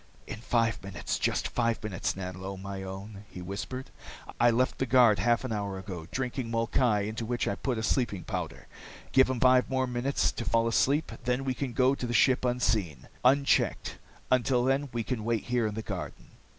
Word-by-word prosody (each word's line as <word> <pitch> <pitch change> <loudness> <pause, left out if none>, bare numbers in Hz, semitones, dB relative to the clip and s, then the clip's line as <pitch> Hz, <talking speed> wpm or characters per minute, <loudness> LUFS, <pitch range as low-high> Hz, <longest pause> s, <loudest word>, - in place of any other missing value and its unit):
"In 110 - -7
five 115 -1 0
minutes, 95 -4 -3
just - - 0
five 115 -2 -1
minutes, 90 -6 -2
Nanlo, 95 +1 -6
my 100 0 -6
own," 95 +2 -8
he - - -9
whispered. 110 +8 -6 0.5
"I 120 - +6
left 125 +2 +1
the 130 - 0
guard 120 -5 +5
half 120 +5 +2
an 130 - -4
hour 100 -2 -3
ago, 95 -4 -7
drinking 130 -2 -3
molkai 115 -1 +1
into 110 +2 -4
which 120 +1 -1
I - - +1
put 125 +3 -2
a 110 - -3
sleeping 110 -7 0
powder. - - -5 0.5
Give 130 -1 +5
him 130 -2 -1
five 130 0 +4
more 130 0 +1
minutes 125 +2 0
to - - -5
fall 115 0 +2
asleep, 140 +6 +2
then 125 +2 0
we 130 - 0
can 125 0 -4
go 130 +3 +3
to 125 -3 -3
the 120 - -2
ship 130 +3 +4
unseen, 110 - 0
unchecked. 135 +2 +2 0.3
Until 125 0 +3
then, 135 +2 +1
we 115 -1 -2
can 115 -2 -3
wait 115 0 0
here 120 -2 0
in 105 - -4
the 110 - -4
garden." - - -6
115 Hz, 195 wpm, -29 LUFS, 105-130 Hz, 0.5 s, I